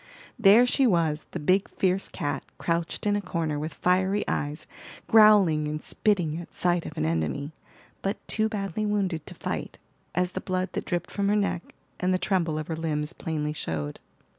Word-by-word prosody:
There 220 Hz, +3 st, +7 dB
she 260 Hz, +1 st, +3 dB
was, 160 Hz, -6 st, +1 dB
the 175 Hz, -, -5 dB
big, 185 Hz, +6 st, +2 dB
fierce 190 Hz, 0 st, 0 dB
cat, 145 Hz, -2 st, -3 dB
crouched 170 Hz, +2 st, -2 dB
in 205 Hz, 0 st, +3 dB
a 205 Hz, -, 0 dB
corner, 165 Hz, -5 st, -2 dB
with 155 Hz, 0 st, -5 dB
fiery 190 Hz, +3 st, +1 dB
eyes, 150 Hz, +2 st, -2 dB, 0.4 s
growling 205 Hz, -9 st, +6 dB
and 150 Hz, 0 st, -4 dB
spitting 175 Hz, -7 st, +1 dB
at 175 Hz, -, -13 dB
sight 175 Hz, -1 st, +1 dB
of -, -, -9 dB
an 75 Hz, -, 0 dB
enemy, 80 Hz, -, -1 dB, 0.5 s
but 195 Hz, +2 st, -1 dB
too 220 Hz, 0 st, +2 dB
badly 200 Hz, -1 st, -3 dB
wounded 190 Hz, -6 st, -1 dB
to -, -, -8 dB
fight, -, -, -4 dB, 0.4 s
as 180 Hz, +1 st, +1 dB
the -, -, -4 dB
blood 185 Hz, 0 st, -1 dB
that -, -, -3 dB
dripped 175 Hz, -1 st, -2 dB
from 200 Hz, -1 st, -1 dB
her 210 Hz, -, +3 dB
neck, 200 Hz, -4 st, -1 dB, 0.2 s
and 180 Hz, +1 st, +1 dB
the 185 Hz, -, +3 dB
tremble 175 Hz, -5 st, 0 dB
of 155 Hz, -, -3 dB
her 160 Hz, -, -3 dB
limbs 155 Hz, -1 st, -2 dB
plainly 150 Hz, -2 st, -3 dB
showed. 75 Hz, -, -4 dB
175 Hz, 185 wpm, -27 LUFS, 155-195 Hz, 0.5 s, There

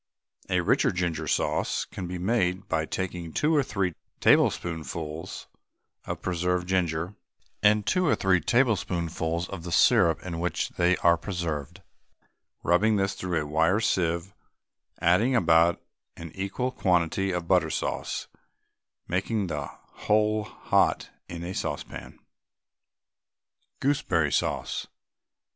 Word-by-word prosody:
A -, -, +2 dB
richer -, -, +2 dB
ginger 85 Hz, -3 st, -2 dB
sauce -, -, 0 dB
can 90 Hz, -, -7 dB
be 90 Hz, +1 st, -4 dB
made 95 Hz, -1 st, 0 dB
by 80 Hz, -3 st, -1 dB
taking 90 Hz, -3 st, -4 dB
two 155 Hz, -, +1 dB
or 145 Hz, -, +5 dB
three 100 Hz, -8 st, -1 dB, 0.3 s
tablespoonfuls 80 Hz, -1 st, 0 dB, 0.6 s
of -, -, -5 dB
preserved 90 Hz, 0 st, -1 dB
ginger 90 Hz, -1 st, 0 dB, 0.5 s
and 105 Hz, 0 st, +4 dB
two 185 Hz, +8 st, +2 dB
or -, -, +4 dB
three 95 Hz, -2 st, +2 dB
tablespoonfuls 85 Hz, -, 0 dB
of 95 Hz, -3 st, -6 dB
the 85 Hz, +1 st, -7 dB
syrup 85 Hz, 0 st, +4 dB
in 85 Hz, -2 st, -4 dB
which 90 Hz, +1 st, -1 dB
they 90 Hz, +1 st, +2 dB
are 85 Hz, 0 st, +6 dB
preserved, 85 Hz, -7 st, -4 dB, 0.8 s
rubbing 105 Hz, +6 st, +3 dB
this 95 Hz, -1 st, +1 dB
through 90 Hz, -3 st, -2 dB
a 75 Hz, -, -3 dB
wire 80 Hz, +7 st, +2 dB
sieve, 85 Hz, -2 st, 0 dB, 0.7 s
adding 105 Hz, +10 st, +3 dB
about 85 Hz, -4 st, +4 dB, 0.4 s
an 85 Hz, -1 st, -8 dB
equal 100 Hz, +7 st, -2 dB
quantity 90 Hz, -3 st, +1 dB
of 90 Hz, -2 st, -3 dB
butter -, -, +3 dB
sauce, -, -, -3 dB, 0.8 s
making 100 Hz, +3 st, -1 dB
the 75 Hz, -5 st, -3 dB
whole 105 Hz, 0 st, -1 dB
hot -, -, 0 dB, 0.2 s
in 85 Hz, -1 st, -6 dB
a 90 Hz, +2 st, -4 dB
saucepan. 80 Hz, -5 st, -5 dB, 1.6 s
GOOSEBERRY 135 Hz, -, +1 dB
SAUCE. -, -, -1 dB
90 Hz, 120 wpm, -27 LUFS, 85-100 Hz, 1.6 s, are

